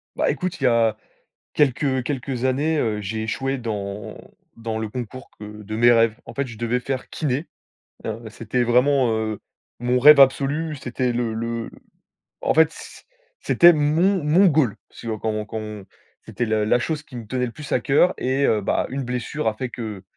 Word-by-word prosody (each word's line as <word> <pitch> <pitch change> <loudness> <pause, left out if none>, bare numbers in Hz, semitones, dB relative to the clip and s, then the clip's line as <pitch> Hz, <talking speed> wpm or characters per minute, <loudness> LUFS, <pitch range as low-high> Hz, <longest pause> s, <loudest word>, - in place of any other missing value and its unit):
Bah, - - +1
écoute, 180 -3 -4
il - - -6
y - - +5
a 115 -2 +2 0.6
quelques 135 -2 +1
quelques 130 -2 -3
années, 145 +5 +1
heu, 110 -5 -1
j'ai 110 +2 -3
échoué 135 +5 -2
dans 105 -4 -5 0.4
dans 115 -1 -4
le 110 -1 -3
concours 125 +3 -7
que - - -9 0.2
de 110 +2 -6
mes 120 +2 +5
rêves. 115 -2 +4
En - - -10
fait, 140 -1 -2
je 115 -3 -10
devais 120 +2 0
faire 130 0 -4
kiné, 145 +1 -2 0.6
heu, 110 +1 -4
c'était 115 +3 -2
vraiment, 125 +1 +3
heu, 110 -1 -2 0.4
mon 125 +1 +1
rêve 150 +3 +8
absolu. 140 +4 +3
C'était 125 -1 -2
le 120 -1 -1
le, 115 0 -4 0.7
en - - +1
fait, 160 0 +5
c'é - - -12 0.4
c'était 175 0 +6
mon 165 +5 +2
mon 170 +7 +5
goal. 145 - +2
Si - - -11
on 110 -2 -3
quand 110 - -2
on 110 0 -2
quand 110 +1 -5
on 105 -2 -8 0.4
c'était 120 - -3
la 110 -1 0
la 120 +3 +3
chose 150 +4 -3
qui 130 - -14
me 115 -3 -7
tenait 125 +2 -1
le 120 - -6
plus 150 +2 -10
à - - +3
cœur 145 +8 +3
et 130 +2 0
heu, 105 - +2
bah, - - 0
une 135 +1 -3
blessure 125 +2 -3
a 110 - +2
fait 125 +3 -5
que 110 -5 -7
125 Hz, 200 wpm, -22 LUFS, 110-140 Hz, 0.7 s, rêve